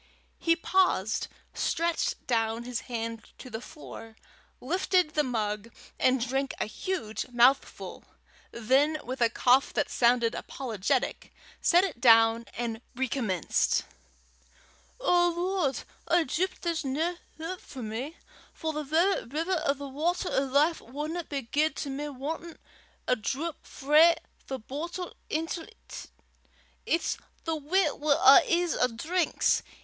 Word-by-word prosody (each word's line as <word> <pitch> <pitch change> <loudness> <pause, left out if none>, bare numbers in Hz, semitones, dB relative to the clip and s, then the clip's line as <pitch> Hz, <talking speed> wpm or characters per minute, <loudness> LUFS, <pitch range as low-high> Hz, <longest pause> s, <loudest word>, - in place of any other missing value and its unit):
He 330 0 +3
paused, 335 - +1 0.3
stretched 335 0 -1
down 225 -1 0
his 245 0 -3
hand 230 -1 -4
to 255 - -11
the 220 - -5
floor, 225 -6 -11 0.4
lifted 360 +3 +1
the 305 - +2
mug, 215 -4 -2 0.3
and 255 -1 +2
drank 270 +2 -1
a - - +1
huge 220 - -4
mouthful; 245 +3 +2 0.4
then 270 +7 +2
with 255 0 -5
a 235 - +5
cough 255 +3 +3
that 290 - 0
sounded 235 -1 +3
apologetic, 250 0 -2 0.3
set 350 +1 +5
it 320 -11 -3
down, 225 -1 +6
and 230 -1 -3
recommenced: 245 -7 0 1.2
"O 350 -7 +4
Lord, 355 -6 0 0.3
I 345 -1 +4
doobt 360 +7 -2
there's 335 -2 -1
nae 315 +6 -1 0.2
houp 335 +3 -5
for 260 -3 -9
me, 240 +9 -5 0.4
for 320 -1 -3
the 305 0 -3
verra 325 - +1
river 325 +6 -1
o' 280 - +3
the 280 0 -7
watter 330 +7 -1
o' - - +2
life 290 +5 +2
wadna 305 +7 -5
be 280 -3 -4
guid 300 +5 +1
to 280 - -4
me 290 +2 -4
wantin' 310 +5 -6 0.5
a 250 - +4
drap 275 +8 -3
frae 305 +4 +5 0.3
the 265 - -3
boatle 335 +9 -6 0.2
intil 325 +1 -2 0.2
't. - - -9 0.8
It's 335 - +1 0.3
the 325 -1 -1
w'y 315 +2 +2
wi' 295 -1 +3
a' 270 0 +8
his 345 0 +2
'at 250 -2 0
drinks. 345 +6 +1
280 Hz, 135 wpm, -28 LUFS, 240-330 Hz, 1.2 s, a